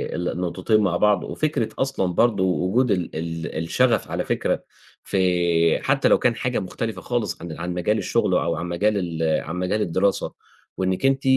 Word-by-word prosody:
ال 90 0 -1
النقطتين 90 +5 0
مع 90 -4 +1
بعض، 105 0 +3
وفكرة 155 -7 -1
أصلًا 135 -10 0
برضه 105 -2 +3
وجود 95 +7 +1
ال 90 -4 -1
ال 80 0 -4
الشغف، 115 +6 +1
على - - -2
فكرة، - - -1 0.4
ف - - -5 0.7
حتى 135 0 +2
لو - - +5
كان 120 -2 +2
حاجة 125 +1 -1
مختلفة 110 +3 -4
خالص 120 -6 -2
عن 85 0 -6
عن 90 +1 -3
مجال 90 +5 0
الشُغل، - - 0
أو 85 -1 +1
عن 80 - -4
مجال 100 +5 +1
ال 80 -4 0
عن 85 - -6
مجال 90 +4 -1
الدراسة، 95 +2 0 0.4
وإنِّك 95 +5 0
أنتِ 135 0 +2
95 Hz, 175 wpm, -23 LUFS, 85-115 Hz, 0.7 s, لو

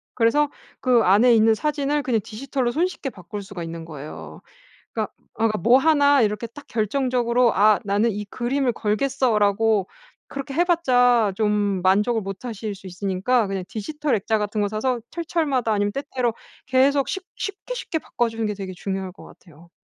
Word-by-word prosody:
그래서 275 +5 +3 0.3
그 250 -3 +3
안에 225 +6 +5
있는 220 0 +5
사진을 295 +3 0
그냥 230 -5 +1
디지털로 250 +2 -2
손쉽게 335 -2 -1
바꿀 200 0 -8
수가 190 -3 -7
있는 165 0 -7
거예요. 135 - -9 0.5
그러니까 - - -3 0.2
아 225 +1 +1
뭐 235 +8 +5
1 285 -2 +4
이렇게 210 +2 0
딱 285 +6 -13
결정적으로 240 +1 +1
아 210 +1 +5
‘나는 205 +3 +2
이 210 +1 -4
그림을 250 +4 -1
걸겠어.’라고 215 -3 +1 0.4
그렇게 275 0 -6
해봤자 250 - +3
좀 205 -3 +1
만족을 210 +5 +3
못 195 +4 -7
하실 215 -3 -4
수 195 0 -13
있으니까 195 +6 0
그냥 195 -1 -3
디지털 295 +5 -2
액자 220 +1 0
같은 210 +1 -2
거 205 - +1
사서 235 +4 -1
철철마다 310 -8 -1
아니면 205 -1 +1
때때로 255 -4 -2 0.3
계속 270 +2 +3
쉽 380 -1 -4
쉽게, 405 +5 -5
쉽게 340 -9 -3
바꿔주는 225 -5 -2
게 210 - -1
되게 195 -2 -6
중요할 190 0 -4
것 - - -15
같아요. 170 0 -17
225 Hz, 355 characters per minute, -23 LUFS, 200-265 Hz, 0.5 s, 안에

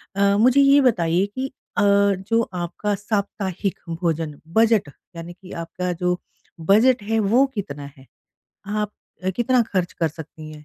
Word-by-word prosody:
अ, 200 0 +3
मुझे 255 +5 +5
ये 280 +1 +6
बताइए 180 -7 +2
कि 265 +1 -3 0.3
अ, - - +3
जो 200 +2 +3
आपका 180 +4 -2
साप्ताहिक 200 -2 -3
भोजन 165 -3 -2
बजट 220 -7 +3 0.3
यानी 170 +1 -7
कि 185 +1 -15
आपका 180 +2 -4
जो 180 0 +1 0.4
बजट 220 +8 +4
है 225 +1 0
वो 230 +7 +4
कितना 145 -8 -5
है? 130 - -16 0.6
आप 210 0 -2 0.3
अ, 190 - +2
कितना 245 0 +3
खर्च 180 -2 0
कर 165 -2 0
सकती 155 0 -10
हैं? 150 0 -12
200 Hz, 150 wpm, -22 LUFS, 170-220 Hz, 0.6 s, ये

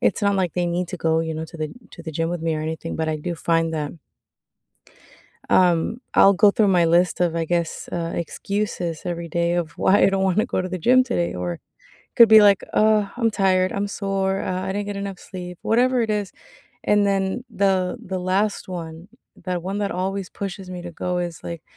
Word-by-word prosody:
it's - - +1
not 200 -1 +2
like 180 -3 -1
they 180 -1 0
need 175 +1 -2
to - - -3
go, 160 0 +1
you 160 -1 -3
know, 160 - -4
to 170 - -10
the 155 -1 -2 0.3
to 170 - -11
the 160 - -6
gym 165 +1 0
with 175 -2 -3
me 165 -1 0
or 155 - -3
anything, 160 +1 -4
but 160 0 -1
I 155 - -1
do 170 +3 -4
find 165 0 0
that 150 -2 -3 1.6
Um, 180 +5 +3
I'll 200 0 +7
go 205 +2 +5
through 205 0 +2
my 175 -3 +4
list 170 +1 +2
of, 170 -2 +2
I 165 - 0
guess, 170 -1 -2
uh, 170 -1 -3
excuses 175 -1 -3
every 170 -1 -4
day 170 +1 0
of 170 -3 -1
why 195 +4 +3
I - - +7
don't 195 0 0
wanna 190 +2 +2
go - - -1
to 185 - -3
the 185 0 -4
gym 255 +9 +5
today, 205 -9 -1
or 90 -1 -4 0.6
could 235 -1 +8
be 220 0 +8
like, 200 -2 +5
"Oh, 215 -2 +3
I'm 230 -2 +1
tired. 185 -2 +2
I'm 200 0 -2
sore. 195 -1 -1
Uh, 185 0 -2
I - - -4
didn't 205 0 -2
get 205 - -4
enough 200 -2 -5
sleep." 180 -2 -8
Whatever 250 +2 +2
it 220 - -1
is, 205 -2 -1 0.5
and 205 -1 +3
then 195 +4 0
the 190 -2 +1
the 185 0 -3
last 190 +4 0
one, 170 -1 -7 0.3
that 175 -1 -4
one 195 +2 -3
that 200 -1 -1
always 190 +1 -3
pushes 195 -1 -6
me 180 -1 -6
to 175 - -7
go 180 +2 -3
is, 175 -2 -4
like, 170 -2 -6
185 Hz, 220 wpm, -22 LUFS, 170-200 Hz, 1.6 s, could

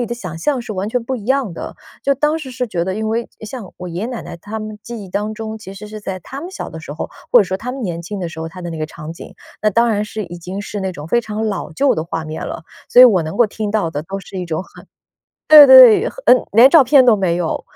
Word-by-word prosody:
己 240 - -1
的 240 - -4
想 180 -9 -7
象 250 - -1
是 220 - -6
完 195 +1 -3
全 245 +1 -1
不 260 +3 -3
一 210 - -9
样 265 -7 0
的。 - - -7 0.3
就 275 - +2
当 300 +4 0
时 280 -5 -8
是 250 +1 -3
觉 170 -4 -2
得， 190 - -3
因 220 +1 -3
为 230 +1 -2
像 215 -2 -8
我 180 - -7
爷 170 +1 -5
爷 - - -2
奶 245 -2 -6
奶 - - -9
他 205 +6 -7
们 215 0 -7
记 235 -3 -7
忆 - - -12
当 210 +3 -3
中， 220 0 -6
其 195 -2 -10
实 210 +2 -9
是 215 0 -8
在 190 -2 -5
他 270 +10 -9
们 345 - -7
小 - - -7
的 160 - -8
时 155 - -10
候， 155 - -6 0.2
或 245 - +7
者 - - +2
说 185 - -4
他 245 +5 -6
们 265 0 -6
年 175 -5 -3
轻 195 +4 -6
的 175 - -3
时 160 - -11
候， 160 - -4
它 180 +2 -11
的 175 - -5
那 160 - -6
个 155 - -2
场 155 0 -9
景， - - -12 0.3
那 215 - +2
当 230 +4 +2
然 210 -2 0
是 215 0 -5
已 175 0 -9
经 185 +3 -6
是 205 -1 -6
那 190 -1 -2
种 150 -3 -9
非 240 - +2
常 220 -1 -4
老 200 -3 -4
旧 275 - +2
的 160 - -2
画 165 -1 -4
面 155 +1 -6
了。 - - -6 0.3
所 250 - +8
以 - - +12
我 200 -8 +5
能 160 0 -6
够 240 -2 +4
听 210 0 -4
到 205 -6 0
的 145 0 -4
都 195 +4 -6
是 190 - -9
一 180 - -3
种 160 +2 -3
很 - - -16 0.6
对 300 -2 +11
对， 260 -4 +8
很 - - -13
嗯 250 - +5
连 240 +5 +7
照 325 -2 +7
片 265 +1 +5
都 240 -3 +6
没 185 -4 0
有。 175 -2 -2
210 Hz, 330 characters per minute, -18 LUFS, 175-240 Hz, 0.6 s, 以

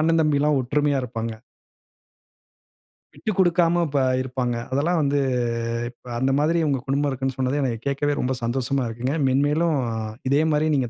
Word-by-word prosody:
அண்ணன் 165 +1 +3
தம்பி 150 -2 +2
எல்லாம் 150 -1 +3
ஒற்றுமையா 145 +2 +1
இருப்பாங்க. 115 -2 -4 1.8
விட்டு 220 - -3
கொடுக்காம 175 -1 +3
இப்ப 140 -1 0 0.2
இருப்பாங்க. 125 -2 -2 0.2
அதெல்லாம் 160 +6 +1
வந்து 145 0 +1 0.7
இப்ப 125 - -16
அந்த 130 +2 +1
மாதிரி 165 +3 +2
உங்க 140 -3 +1
குடும்பம் 140 +1 +1
இருக்குன்னு 135 0 -3
சொன்னது, 130 +2 0
எனக்கு 120 -4 -1
கேட்கவே 145 +1 0
ரொம்ப 130 +1 0
சந்தோஷமா 130 +2 0
இருக்குங்க. 120 +5 -2
மென்மேலும் 145 +4 +2 0.5
இதே 140 +2 +4
மாரியே 155 +1 +2
நீங்க 125 -3 0
140 Hz, 150 wpm, -23 LUFS, 130-150 Hz, 1.8 s, இதே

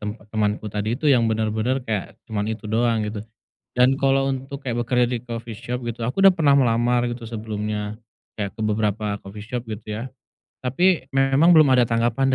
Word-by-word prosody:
tempat 105 0 -6
temanku 105 0 0
tadi 105 +3 -1
itu - - -9
yang 115 -3 +3
bener-bener 110 +4 -1
kayak 105 -3 -3
cuman 110 -3 -3
itu 110 -1 -5
doang, 115 +1 +1
gitu. 105 0 -4 0.5
Dan 125 +2 +4
kalo 135 0 +2
untuk 135 +2 -8
kayak 120 -2 -2
bekerja 125 0 +2
di 125 -1 -2
coffee 115 -2 -6
shop 125 +4 -4
gitu, 115 0 -4
aku 125 +11 -1
udah 195 -1 +8
pernah 150 -4 +4
melamar 120 -2 +3
gitu 120 -1 -6
sebelumnya, 105 -1 -4 0.4
kayak 100 -2 -3
ke - - -12
beberapa 105 -1 0
coffee 105 +2 -9
shop 125 -1 -3
gitu 105 -1 -6
ya, 115 - -4 0.6
tapi 135 +3 +1
memang 135 +6 +5
belum 155 -4 +6
ada 120 - +4
tanggapan 120 +3 +1
115 Hz, 185 wpm, -23 LUFS, 110-130 Hz, 0.6 s, udah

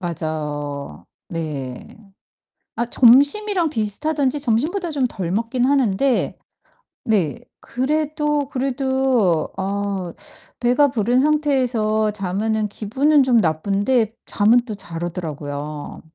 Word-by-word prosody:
맞어. 150 -4 -5 0.2
네. 145 -7 -5 0.9
아 235 - -1
점심이랑 295 - +4
비슷하든지 280 +5 0
점심보다 310 - 0
좀 280 -4 -1
덜 185 -7 -5
먹긴 230 +5 0
하는데 265 -2 +1 0.7
네 200 - +1 0.2
그래도, 295 +2 -1
그래도 265 - 0
어 195 -2 -3 0.5
배가 250 +4 +3
부른 240 +1 +1
상태에서 255 -8 +1
자면은 210 +2 -1
기분은 270 +8 +2
좀 250 -2 +3
나쁜데 200 +6 +1
잠은 220 +4 +4
또 215 - -5
잘 170 -4 -6
오더라고요. 150 -4 -6
225 Hz, 220 characters per minute, -21 LUFS, 185-270 Hz, 0.9 s, 점심이랑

